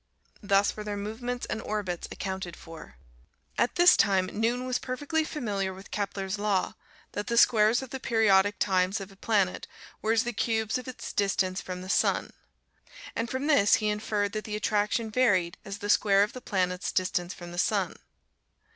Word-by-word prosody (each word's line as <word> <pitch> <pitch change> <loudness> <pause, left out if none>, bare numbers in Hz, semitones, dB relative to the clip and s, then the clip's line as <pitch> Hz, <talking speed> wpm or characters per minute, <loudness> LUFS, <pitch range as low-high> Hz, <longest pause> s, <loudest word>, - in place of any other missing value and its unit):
Thus 200 -1 +2
were 210 - -6
their 205 -1 -4
movements 240 +4 -4
and - - -4
orbits 200 -5 -3
accounted 190 -3 -5
for. 165 - -12 0.6
At 240 - +1
this 350 +1 +7
time 190 -3 +2
Newton 235 +4 0
was 255 -1 -1
perfectly 290 +5 -1
familiar 200 - -3
with 190 +1 -13
Kepler's 200 -1 -3
Law, 205 -3 0 0.4
that 205 +2 -4
the 235 -1 0
squares 230 +1 +5
of 260 - -10
the 265 - -4
periodic 205 -4 +3
times 190 0 +1
of 195 0 -8
a - - -16
planet 195 -2 0 0.3
were 220 - +1
as 225 - +3
the 240 - -3
cubes 220 +1 0
of 250 - -10
its 255 - -7
distance 195 -2 0
from 180 0 -6
the - - -8
sun. - - +1 0.8
And 230 +1 -2
from 260 +3 -2
this, 285 -10 +5
he 215 -1 0
inferred 210 -1 -1
that 215 0 -4
the 210 - -4
attraction 210 +1 0
varied 195 -8 +2
as 200 -1 -6
the 205 -1 -6
square 200 -1 +4
of 210 - -3
the 255 - -8
planet's 180 -4 -1
distance 180 -1 -1
from 175 -1 -9
the 175 - -4
sun. 195 -3 0
205 Hz, 180 wpm, -28 LUFS, 190-230 Hz, 0.8 s, this